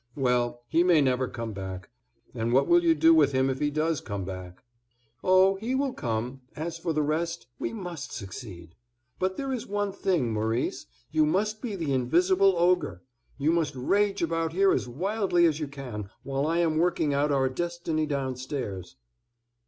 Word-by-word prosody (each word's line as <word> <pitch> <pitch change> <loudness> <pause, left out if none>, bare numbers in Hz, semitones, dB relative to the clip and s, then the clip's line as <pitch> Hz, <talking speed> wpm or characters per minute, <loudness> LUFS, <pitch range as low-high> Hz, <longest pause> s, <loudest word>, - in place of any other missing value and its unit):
"Well, 120 -2 0
he 165 +7 +3
may 175 -3 +5
never 130 -2 +2
come 115 -3 -5
back; 95 0 -7 0.4
and 115 -1 -2
what 135 - +4
will 345 0 +5
you 330 -1 +4
do 330 0 +6
with 320 - +4
him 130 0 +2
if 130 - -4
he 145 - +1
does 155 0 0
come 100 -3 -5
back?" 90 -1 -8 0.6
"Oh, 185 +1 +5
he 230 +6 -2
will 270 -1 0
come; 120 +3 -3
as 165 +2 -4
for 165 0 -2
the 155 -1 +1
rest, 155 -4 -2
we - - -2
must 180 -10 -6
succeed. 95 -5 -8 0.5
But 185 0 -1
there 275 -1 -3
is 245 - -4
one 205 0 -1
thing, 180 - 0
Maurice, 110 +3 -1 0.2
you 155 0 +3
must 210 +6 0
be 230 -5 -4
the 160 -7 -2
invisible 180 +9 +3
ogre; 180 +1 +1 0.3
you 145 +3 +2
must 165 -5 0
rage 200 +9 +1
about 165 0 -1
here 195 +2 +4
as - - 0
wildly 180 - +1
as 155 -2 +2
you 150 - -3
can, 125 -8 -7
while 135 +1 -1
I 165 +1 +1
am 160 -2 +1
working 165 -4 +1
out 145 +1 +1
our 135 -2 +2
destiny 165 +1 -2
downstairs." 130 - -4
155 Hz, 180 wpm, -27 LUFS, 125-180 Hz, 0.6 s, do